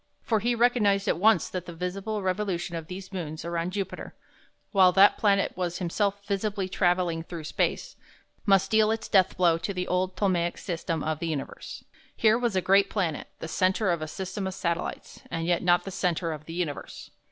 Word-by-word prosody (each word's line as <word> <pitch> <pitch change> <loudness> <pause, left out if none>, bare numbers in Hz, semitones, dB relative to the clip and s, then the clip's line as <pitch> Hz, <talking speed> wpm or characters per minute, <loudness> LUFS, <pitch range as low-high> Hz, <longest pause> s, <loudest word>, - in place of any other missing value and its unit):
For 225 -3 +1
he 240 +3 +1
recognized 220 -4 +3
at - - +1
once 205 -4 +4
that 185 -1 -5
the 170 - -8
visible 195 +4 -3
revolution 185 -2 -2
of 165 -1 -5
these 185 +2 -8
moons 160 -4 -5
around 170 +1 -2
Jupiter, 195 -1 -5 0.6
while 190 -3 +6
that 195 +2 +7
planet 200 -2 +2
was 180 -1 -2
himself 200 +3 -1
visibly 200 -1 -1
travelling 175 -3 +1
through 165 -1 -8
space, 150 - -1 0.5
must 195 -1 +3
deal 220 -1 +4
its 225 0 -2
death 190 -3 +3
blow 170 -3 +3
to 200 +3 -4
the 180 0 -2
old 185 0 0
Ptolemaic 175 -3 +1
system 165 -3 -3
of 155 -1 -2
the 170 - -3
universe. 150 -4 -5 0.3
Here 220 +1 +4
was 240 -5 0
a 185 - +2
great 195 +2 +4
planet, 175 -7 -2
the - - -6
centre 185 +4 +1
of 170 -2 -1
a 155 - -3
system 190 +4 -4
of 190 - -5
satellites, 170 -2 -3
and 165 0 -3
yet 175 0 +1
not 175 -1 +3
the 195 - -6
centre 175 -2 -1
of 155 -1 -7
the 165 - -8
universe. 165 -4 -5
185 Hz, 195 wpm, -27 LUFS, 170-200 Hz, 0.6 s, that